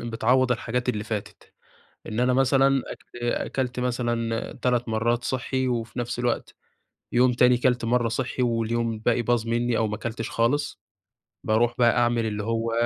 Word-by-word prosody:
بتعوض 120 +2 +2
الحاجات 125 +1 -3
اللي 105 -4 -1
فاتت، 110 -3 -6 0.5
إن 110 +3 -3
أنا 125 0 +3
مثلًا 135 +1 +3
أك 120 - -12
أكلت 125 +1 -2
مثلًا 120 -2 -1
3 125 -1 +1
مرّات 115 +2 0
صحّي 130 0 -1
وفي 115 -1 -3
نفْس 120 0 -3
الوقت، 120 -1 -2 0.6
يوم 125 +1 +4
تاني 125 0 +4
كلت 125 -1 +1
مَرّة 120 0 +2
صحي 125 +2 -2
واليوم 115 -1 0
الباقي 115 +2 0
باظ 120 -1 0
مني 120 0 +1
أو 110 - +1
ما 105 - -3
كلتش 115 0 -5
خالص، 145 +6 0 0.6
باروح 120 +2 +2
بقى 120 -1 +4
أعمل 120 -1 +2
اللي 105 -1 -3
هو 115 0 -1
120 Hz, 160 wpm, -25 LUFS, 115-125 Hz, 0.6 s, يوم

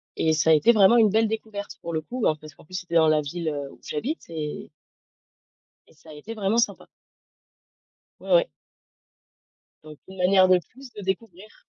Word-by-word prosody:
et 160 - +1
ça 155 +1 +1
a - - +8
été 220 +10 +5
vraiment 215 +1 +5
une 220 -3 +5
belle 220 +2 +2
découverte 215 -2 -6
pour 170 - -6
le 160 - -1
coup, 245 +10 -7
ben 155 - +2
parce 155 0 -13
qu'en - - -18
plus, 185 - -19
c'était 175 -2 -5
dans 160 -1 +5
la 155 -1 +3
ville 155 +1 -4 0.2
où - - -18
j'habite 270 - -4
et 155 -3 -6 1.2
et - - -23
ça 160 +1 -19
a 155 - -10
été 205 +10 -9
vraiment 210 +1 -1
sympa. 235 - 0 1.3
Ouais - - -8
ouais. - - +5 1.4
Donc, 155 -1 -12
une 190 0 -12
manière 185 +1 +4
de 185 -1 +5
plus 250 - -15
de 205 - -9
découvrir. 200 - -6
185 Hz, 190 wpm, -24 LUFS, 160-220 Hz, 1.4 s, a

